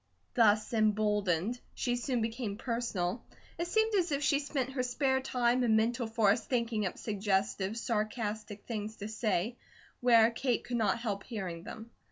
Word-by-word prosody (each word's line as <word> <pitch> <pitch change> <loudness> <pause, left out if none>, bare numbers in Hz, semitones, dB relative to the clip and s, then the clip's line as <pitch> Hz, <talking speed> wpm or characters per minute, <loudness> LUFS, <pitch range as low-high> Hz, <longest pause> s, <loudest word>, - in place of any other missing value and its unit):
Thus 215 -1 +3
emboldened 210 -1 +1 0.2
she 245 - 0
soon 245 0 -1
became 225 -2 -3
personal. 230 -4 -2 0.4
It 340 - -1
seemed 440 +4 +2
as 360 -5 +2
if 280 0 0
she 285 -1 +3
spent 275 -3 -2
her 265 -1 -1
spare 265 +1 +1
time 250 -1 +1
and 225 -3 +4
mental 235 +2 +1
force 220 -1 +2
thinking 230 -4 0
up - - -6
suggestive, 200 0 -1
sarcastic 215 -2 -2
things 220 -2 -4
to 205 - -6
say, 220 0 -1 0.4
where 235 -2 +6
Kate 240 +1 0
could 245 - -2
not 225 +1 +2
help 210 -4 -3
hearing 185 -8 -5
them. 225 +1 -9
230 Hz, 160 wpm, -32 LUFS, 210-245 Hz, 0.4 s, where